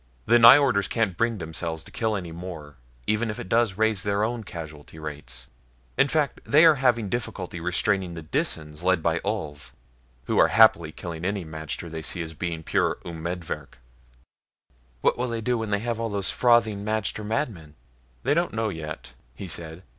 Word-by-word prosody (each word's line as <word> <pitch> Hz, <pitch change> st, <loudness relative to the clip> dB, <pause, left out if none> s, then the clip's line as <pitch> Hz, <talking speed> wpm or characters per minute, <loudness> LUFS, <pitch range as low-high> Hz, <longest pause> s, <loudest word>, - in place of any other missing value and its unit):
"The 120 Hz, +2 st, +5 dB
Nyjorders 120 Hz, -4 st, +7 dB
can't 110 Hz, -6 st, 0 dB
bring 115 Hz, +3 st, 0 dB
themselves 80 Hz, -1 st, -4 dB
to -, -, -14 dB
kill 110 Hz, -2 st, -1 dB
any 90 Hz, -4 st, -5 dB
more, 80 Hz, -4 st, -8 dB, 0.3 s
even 110 Hz, +2 st, +1 dB
if 105 Hz, -, -4 dB
it -, -, -6 dB
does 115 Hz, -1 st, +2 dB
raise 110 Hz, -2 st, +2 dB
their 100 Hz, 0 st, 0 dB
own 115 Hz, +1 st, -2 dB
casualty 80 Hz, -4 st, -9 dB
rate. 75 Hz, -2 st, -7 dB, 0.5 s
In 135 Hz, -, +4 dB
fact, 150 Hz, -1 st, 0 dB
they 155 Hz, +4 st, +6 dB
are 160 Hz, -3 st, +7 dB
having 120 Hz, -5 st, +3 dB
difficulty 95 Hz, -6 st, -4 dB
restraining 90 Hz, +1 st, 0 dB
the 80 Hz, -, -7 dB
Disans 75 Hz, 0 st, -2 dB
led 90 Hz, -2 st, +2 dB
by 80 Hz, 0 st, +1 dB
Ulv, 85 Hz, -9 st, -4 dB, 0.5 s
who -, -, 0 dB
are -, -, +7 dB
happily 85 Hz, -8 st, +5 dB
killing 85 Hz, 0 st, -7 dB
any 100 Hz, -1 st, -2 dB
magter 80 Hz, +1 st, -6 dB
they 80 Hz, -1 st, -6 dB
see 85 Hz, +2 st, -2 dB
as 80 Hz, 0 st, -7 dB
being 85 Hz, 0 st, -4 dB
pure -, -, +1 dB
umedvirk." 85 Hz, -3 st, -5 dB, 1.2 s
"What -, -, +2 dB
will 125 Hz, -, 0 dB
they 115 Hz, -1 st, -3 dB
do 120 Hz, +1 st, 0 dB
when 110 Hz, -1 st, -3 dB
they 100 Hz, -, +2 dB
have 115 Hz, -1 st, -2 dB
all 115 Hz, 0 st, -1 dB
those 100 Hz, -3 st, -1 dB
frothing 115 Hz, -4 st, +3 dB
magter 110 Hz, 0 st, -2 dB
madmen?" 105 Hz, -, -3 dB, 0.5 s
"They 140 Hz, -, +2 dB
don't 170 Hz, +3 st, 0 dB
know 110 Hz, -1 st, 0 dB
yet," 75 Hz, -8 st, -7 dB, 0.2 s
he 95 Hz, -, -7 dB
said. 85 Hz, +1 st, -6 dB
95 Hz, 180 wpm, -25 LUFS, 80-115 Hz, 1.2 s, Nyjorders